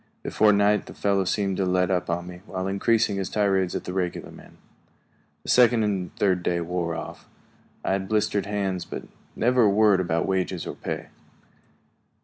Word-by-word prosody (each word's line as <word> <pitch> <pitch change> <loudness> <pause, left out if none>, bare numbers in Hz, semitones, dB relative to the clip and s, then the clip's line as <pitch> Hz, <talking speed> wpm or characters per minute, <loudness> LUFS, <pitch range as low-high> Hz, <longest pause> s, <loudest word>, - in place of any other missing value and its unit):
Before 105 0 +3
night 105 0 +2
the - - -10
fellow 100 -1 +1
seemed 95 0 0
to 95 - +1
let 90 +1 +1
up 90 -1 0
on 85 +1 -2
me, 90 0 -10
while 95 -1 -4
increasing 100 +1 +1
his 95 - -2
tirades 95 -3 +1
at - - -3
the 90 - -5
regular 90 -2 -3
men. - - -15 0.9
The - - -8
second 120 -2 +5
and 95 -4 -1
third 95 -3 +1
day 85 0 0
wore 85 -1 -2
off. 80 - -8 0.6
I - - +1
had 95 0 -1
blistered 105 -2 0
hands, 95 -3 -2
but - - -7 0.3
never 125 +2 +2
a - - +5
word 105 -1 +4
about 85 -2 0
wages 95 -2 -1
or - - -5
pay. - - -5
95 Hz, 180 wpm, -25 LUFS, 90-105 Hz, 0.9 s, second